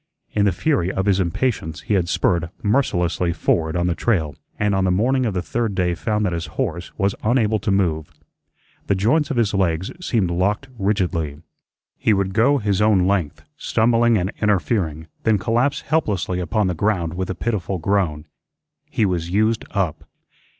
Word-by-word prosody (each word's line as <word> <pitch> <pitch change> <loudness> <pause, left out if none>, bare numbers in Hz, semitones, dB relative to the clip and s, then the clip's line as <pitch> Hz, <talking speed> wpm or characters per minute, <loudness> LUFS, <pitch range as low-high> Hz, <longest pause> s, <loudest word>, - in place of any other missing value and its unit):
In 105 -1 +2
the 100 - +3
fury 115 - 0
of 95 - -2
his 100 -2 +3
impatience 85 -2 -1
he - - -2
had 90 -4 +1
spurred 85 -2 +1
mercilessly 90 - +1
forward 80 -1 0
on 90 0 +1
the 90 - +1
trail, 80 - 0 0.2
and 105 -1 +1
on 95 -1 +1
the 95 - +2
morning 125 +7 +2
of 105 - -2
the 90 - -1
third 110 +4 -2
day 90 -2 +1
found 105 +4 -1
that 90 - 0
his 85 -1 -3
horse 85 +2 -2
was 100 0 +1
unable 110 -2 +2
to 105 - -3
move. 85 -6 +1 0.8
The 100 - +2
joints 125 +11 +2
of 140 - -2
his 110 -3 +2
legs 95 -2 0
seemed 105 - +1
locked 100 +8 0
rigidly. 85 -7 -1 0.6
He 110 - +3
would 95 -1 0
go 125 +7 +4
his 105 -4 0
own 105 -4 +4
length, 80 -7 -1
stumbling 115 0 +2
and 95 +1 -1
interfering, 95 -6 0 0.2
then 110 -2 +3
collapse 120 +8 0
helplessly 100 - -1
upon 105 +4 0
the 90 - 0
ground 85 -2 0
with 95 +1 -3
a 95 - -2
pitiful 100 -2 -2
groan. 85 -4 0 0.6
He 110 - +1
was 85 -3 -1
used 110 +4 +1
up. 95 -7 -2
95 Hz, 180 wpm, -21 LUFS, 85-110 Hz, 0.8 s, go